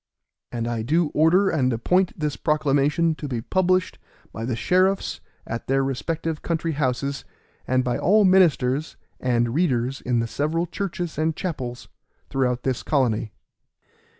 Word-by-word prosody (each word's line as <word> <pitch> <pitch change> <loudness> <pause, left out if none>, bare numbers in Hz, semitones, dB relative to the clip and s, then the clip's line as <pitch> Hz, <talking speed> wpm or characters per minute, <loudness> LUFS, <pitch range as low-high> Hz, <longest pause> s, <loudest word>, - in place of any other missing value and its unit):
And 115 -1 -3
I 120 -1 -2
do 155 +7 +1
order 175 +7 +3
and 130 -5 +1
appoint 180 +11 +1
this 150 -2 -1
proclamation 150 +1 +1
to 150 -1 -6
be 125 -4 -2
published 185 +7 0 0.3
by 110 +1 -4
the 120 -1 -1
sheriffs 185 +9 +1 0.2
at 115 +1 -5
their 135 +1 +2
respective 155 +4 -3
country 165 -1 -1
houses, 140 -1 -1 0.4
and 130 0 +2
by 125 -1 -1
all 210 +2 +4
ministers 155 -7 +3 0.2
and 120 -2 +1
readers 135 -5 0
in 125 -1 0
the 115 - +1
several 155 +8 -1
churches 175 -2 -4
and 160 0 +1
chapels 130 -10 -5 0.4
throughout 125 -2 0
this 130 -3 -1
colony. 115 -7 0
145 Hz, 145 wpm, -24 LUFS, 125-170 Hz, 0.4 s, all